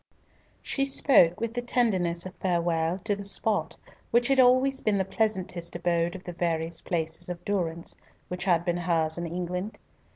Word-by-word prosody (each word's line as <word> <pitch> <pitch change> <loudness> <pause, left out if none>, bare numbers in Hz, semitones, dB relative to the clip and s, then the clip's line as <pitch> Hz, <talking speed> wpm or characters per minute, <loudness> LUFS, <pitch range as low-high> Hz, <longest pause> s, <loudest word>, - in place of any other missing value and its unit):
She 275 0 0
spoke 255 -11 +4
with 230 0 -3
the 245 - -2
tenderness 190 -9 0
of 185 - -7
farewell 170 -1 0
to 210 -2 0
the 200 - -7
spot 205 +2 +1 0.3
which 240 +2 +3
had 270 -1 +3
always 260 +2 +4
been 210 -2 +1
the 190 - 0
pleasantest 190 -5 -2
abode 170 0 0
of 185 - -9
the 175 - -7
various 165 -1 -1
places 165 -1 -3
of 175 -1 -7
durance 170 -4 -2 0.3
which 180 +1 -5
had 175 -3 +2
been 175 -1 0
hers 165 -2 0
in 170 - -3
England. 180 +4 -4
180 Hz, 170 wpm, -27 LUFS, 170-215 Hz, 0.3 s, spoke